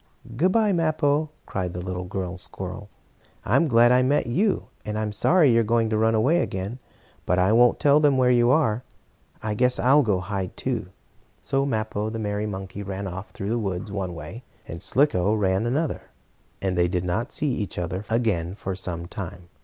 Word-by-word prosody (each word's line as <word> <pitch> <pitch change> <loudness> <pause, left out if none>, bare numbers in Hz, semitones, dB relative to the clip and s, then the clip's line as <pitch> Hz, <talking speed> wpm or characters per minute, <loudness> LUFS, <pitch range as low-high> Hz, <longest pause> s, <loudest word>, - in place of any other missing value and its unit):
"Good 175 +9 +2
bye, 215 -1 +3
Mappo!" 155 -2 +1 0.2
cried 90 -2 -4
the - - -3
little 90 -1 -4
girl 90 0 -4
squirrel. 95 +2 -7 0.6
"I - - +1
am 165 - +4
glad 120 -2 +5
I 125 0 +5
met 140 +3 +2
you, 190 - 0
and 105 0 -4
I'm 110 -1 -2
sorry 155 - +4
you're 115 0 +4
going 115 0 +1
to - - +1
run 110 0 +3
away 140 +11 +3
again. 95 +7 -4 0.5
But 90 - +2
I 95 +2 +3
won't 120 +1 +5
tell 145 +1 +5
them 145 -3 +3
where 125 -1 +4
you 120 -1 +4
are. 125 -5 +2 0.6
I 110 -1 -1
guess 125 +3 +2
I'll 135 +4 +5
go 105 -8 +1
hide, 95 0 -4
too." 120 -7 -2 0.5
So 135 +1 0
Mappo, 110 -3 -2
the 115 - -5
merry 105 -1 -2
monkey, 95 0 -6
ran 100 0 -5
off 95 +2 -6
through 100 - -6
the 120 +1 0
woods 95 -2 -3
one 95 -3 -3
way, 85 +10 -8 0.2
and 85 +1 -7
Slicko 105 -6 +2
ran 100 +2 +1
the 140 - +2
other, 160 -2 -4 0.5
and 95 -1 0
they 90 0 +3
did 90 0 -1
not 110 +9 -2
see 150 -2 -1
each 105 -5 -4
other 90 +3 -3
again 100 -7 0
for 95 -2 -4
some 90 -2 -5
time. 90 -2 -8
110 Hz, 200 wpm, -24 LUFS, 95-125 Hz, 0.6 s, glad